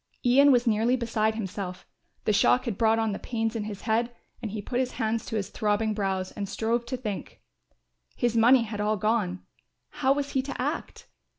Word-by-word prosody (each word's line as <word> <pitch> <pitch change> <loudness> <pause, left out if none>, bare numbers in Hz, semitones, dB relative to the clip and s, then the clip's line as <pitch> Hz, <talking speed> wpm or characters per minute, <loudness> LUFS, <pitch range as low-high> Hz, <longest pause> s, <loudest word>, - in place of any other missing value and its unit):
Ian 275 +4 +6
was 245 -1 +4
nearly 230 +2 +3
beside 220 -3 0
himself, 190 -3 -5 0.4
the 215 - +3
shock 245 +5 +4
had 230 -5 -2
brought 225 +2 +3
on 225 -1 +1
the 200 - -4
pains 225 -1 -2
in 215 -2 -2
his 205 -2 -6
head 230 +2 0 0.3
and 225 - -3
he 215 +1 -5
put 245 +5 -2
his 255 -1 -1
hands 220 0 -1
to 225 - -4
his 200 -2 -2
throbbing 215 0 0
brows 190 -2 -2
and 200 -1 -5
strove 235 +1 -1
to 255 - -3
think. 210 -6 -6 0.8
His 240 -2 0
money 235 +2 +6
had 210 -2 -4
all 210 +1 +1
gone; 205 -3 0 0.5
how 270 -1 +2
was 285 0 -3
he 265 - +1
to 275 +1 -6
act? - - -3
225 Hz, 200 wpm, -27 LUFS, 210-240 Hz, 0.8 s, Ian